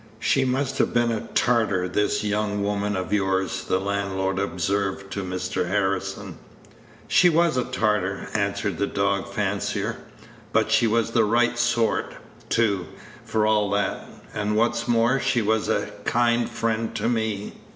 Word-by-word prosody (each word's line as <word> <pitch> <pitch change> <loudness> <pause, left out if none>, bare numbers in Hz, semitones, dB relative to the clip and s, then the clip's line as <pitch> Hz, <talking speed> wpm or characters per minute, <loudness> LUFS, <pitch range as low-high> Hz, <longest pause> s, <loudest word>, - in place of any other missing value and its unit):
"She 135 +2 +2
must 130 +1 -1
have - - +1
been 120 0 +3
a 110 - -3
tartar, 110 -7 +2
this 105 +4 0
young 105 -1 -1
woman 105 0 -1
of 95 +2 -3
yours," 95 -2 0
the 95 - +1
landlord 95 -1 -1
observed 95 +1 -2
to 100 - -3
Mr. 90 -1 -2
Harrison. 100 +1 -2 0.7
"She 180 - +5
was 170 -2 +3
a 125 - 0
tartar," 100 -3 -1
answered 100 -1 -1
the 100 - +1
dog 100 0 -1
fancier; 100 0 -2 0.5
"but - - +2
she 115 - +4
was 115 +1 +1
the 115 -1 +3
right 120 +3 +2
sort, 120 -2 0 0.3
too, 100 -6 +1 0.4
for 110 -1 0
all 105 -1 +2
that; 100 0 -1 0.3
and, 105 0 -1
what's 115 +1 +1
more, 120 +3 +3
she 125 -3 +1
was 110 +1 +1
a - - 0
kind 120 0 +2
friend 115 0 -2
to - - -1
me. 110 -4 -1
105 Hz, 150 wpm, -24 LUFS, 100-115 Hz, 0.7 s, She